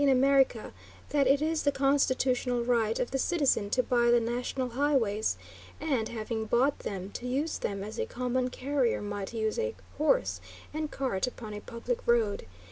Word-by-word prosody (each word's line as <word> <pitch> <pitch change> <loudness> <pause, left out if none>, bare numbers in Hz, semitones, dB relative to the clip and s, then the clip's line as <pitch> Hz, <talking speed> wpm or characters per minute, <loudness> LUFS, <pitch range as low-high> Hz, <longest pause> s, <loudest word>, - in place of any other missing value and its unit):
in 285 - +4
America, 265 -3 +3 0.4
that 285 -2 +2
it 280 +2 +4
is 320 0 +1
the 285 - +2
constitutional 260 -3 +2
right 230 -2 +1
of 245 - -1
the 270 - -1
citizen 280 -11 +2
to 255 +4 +2
buy 240 -1 +2
the 240 0 +6
national 245 +2 -2
highways, 240 -5 +1 0.4
and, 265 -8 0
having 220 0 -3
bought 255 +6 +2
them, 195 0 -5
to 245 - -6
use 285 +6 -1
them 200 -1 -3
as 215 +2 -7
a - - 0
common 250 +1 -1
carrier 260 -2 0
might 205 -1 -4
use 220 -2 -1
a 470 0 -1 0.2
horse - - +2 0.3
and 310 0 -2
cart 255 -7 -1
upon 225 -4 -7
a 210 - -6
public 235 +1 -3
road. 225 - +2
250 Hz, 175 wpm, -29 LUFS, 225-275 Hz, 0.4 s, the